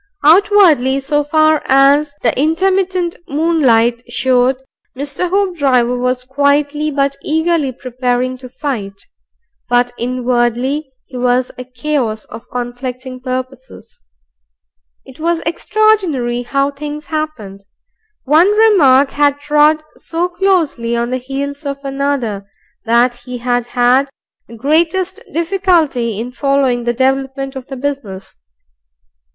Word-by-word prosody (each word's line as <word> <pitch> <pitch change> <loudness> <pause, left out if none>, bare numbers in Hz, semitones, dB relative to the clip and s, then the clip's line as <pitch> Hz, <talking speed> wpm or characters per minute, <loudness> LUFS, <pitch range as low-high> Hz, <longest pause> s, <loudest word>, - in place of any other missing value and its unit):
Outwardly, 320 -6 +5
so 295 +2 0
far 310 +1 +3
as 280 +2 +4
the - - +2
intermittent 360 +3 0
moonlight 260 -7 +2
showed, 255 +1 +2 0.4
Mr. 285 +5 -3
Hoopdriver 285 -11 +1
was 250 0 -1
quietly 285 +3 +1
but 275 -1 -1
eagerly 320 -2 0
prepared 255 0 -2
to 255 -1 -10
fight. 215 -8 -5 0.7
But 245 0 +2
inwardly 250 +3 -1
he 255 - -9
was 250 0 +1
a 250 - -7
chaos 250 -4 -2
of 230 - -12
conflicting 250 +1 -6
purposes. 255 0 -7 1.0
It 265 +1 -15
was 335 +1 0
extraordinary 330 - +1
how 275 +3 0
things 295 +1 -7
happened. 275 -12 -5 0.6
One 315 +7 +4
remark 285 -12 +5
had 285 0 +1
trod 300 +1 +3
so 340 +2 -2
closely 345 -11 0
on 235 +1 -2
the 255 - 0
heels 280 +3 -5
of 280 -1 -3
another, 270 -8 -2 0.4
that 235 +2 +3
he 245 +1 -8
had 245 0 -1
had 250 +3 +2 0.4
the 230 - -12
greatest 325 - 0
difficulty 330 - 0
in 240 +2 -5
following 265 -2 0
the 240 - +1
development 270 +1 -1
of 265 -1 -8
the 270 - -7
business. 250 - -5
270 Hz, 115 wpm, -15 LUFS, 245-305 Hz, 1.0 s, Outwardly